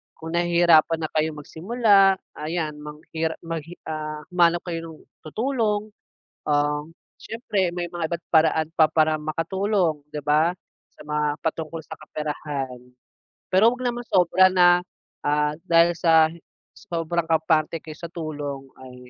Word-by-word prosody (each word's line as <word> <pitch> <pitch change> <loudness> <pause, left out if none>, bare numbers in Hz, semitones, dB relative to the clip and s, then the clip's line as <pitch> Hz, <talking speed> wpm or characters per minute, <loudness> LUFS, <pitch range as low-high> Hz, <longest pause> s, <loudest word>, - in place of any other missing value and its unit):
kung 160 0 -9
nahihirapan 170 -2 +4
na 155 - -2
kayong 155 0 0
magsimula, 195 +3 +3 0.2
ayan 155 -1 -3
manghira 160 +2 -4
maghi 165 0 -6 0.2
ah, 155 -1 -4
humanap 175 -1 +3
kayo 165 -1 -3
ng - - -16 0.3
tutulong, 215 - -1 0.6
um, 150 +1 0 0.2
siyempre 210 -5 -2
may 175 0 -3
mga 170 -1 -4
iba't 170 0 -3
paraan 160 -1 +3
pa 160 - +6
para 155 -1 +3
makatulong, 165 +1 -1
'di 150 - -4
ba, 155 +4 +3 0.4
sa - - -21
mga 150 0 0
patungkol 160 0 -3
sa - - -10
kaperahan. 150 -4 -5 0.7
Pero, 205 +5 +5
wag 255 - -9
naman 240 -1 -2
sobra 185 -2 +4
na, 175 -1 +5 0.4
ah, 150 0 +1
dahil 170 0 +4
sa, 160 -1 +5 0.5
sobrang 170 -3 -2
kampante 160 0 +1
kayo 155 -1 -10
sa 170 -1 -8
tulong 145 -5 -5 0.2
ay, 130 -1 -11
165 Hz, 135 wpm, -24 LUFS, 155-175 Hz, 0.7 s, pa